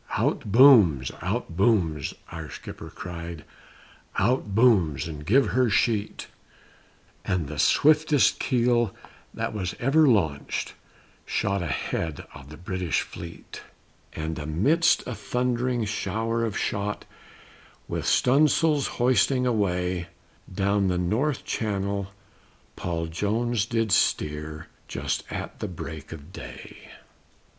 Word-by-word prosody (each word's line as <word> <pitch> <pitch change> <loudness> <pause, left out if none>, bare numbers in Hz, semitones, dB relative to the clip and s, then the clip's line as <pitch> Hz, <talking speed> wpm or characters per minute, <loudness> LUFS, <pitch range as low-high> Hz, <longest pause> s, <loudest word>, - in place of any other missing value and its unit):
"Out 105 - -1
booms! 105 - +6
out 85 - -3
booms!" 85 - +1 0.2
our 80 -2 -7
skipper - - -9
cried, 85 -2 -7 0.7
"out 105 -1 +1
booms 100 - +3
and 75 -2 -7
give 130 - +3
her 130 -1 +2
sheet," 110 0 0 1.0
And 90 -6 -1
the 75 0 -6
swiftest 155 -1 +4
keel 120 -3 +1 0.4
that - - -3
was 95 -4 -3
ever 145 +5 +4
launched 80 - 0 0.5
shot 100 -1 -1
ahead 80 -2 -3
of 70 - -12
the 75 - -10
British 90 -2 -1
fleet, 85 -1 -9 0.5
And 80 0 -4
amidst 100 - +2
a 125 - -4
thundering 125 +2 -1
shower 110 +3 -1
of 110 -3 -3
shot 105 0 -2 0.8
with - - -3
stun' 140 +5 +4
sails 150 -2 +2
hoisting 125 +1 +3
away, 90 -6 0 0.4
Down 100 +1 +1
the 90 -1 0
North 115 +11 0
Channel 100 -2 -2 0.7
Paul 85 -2 -3
Jones 105 +6 -1
did 115 -2 0
steer 75 -2 0 0.2
just - - -3
at - - -6
the - - -3
break 80 -4 -8
of 80 +2 -10
day. - - -10
100 Hz, 115 wpm, -26 LUFS, 85-120 Hz, 1.0 s, booms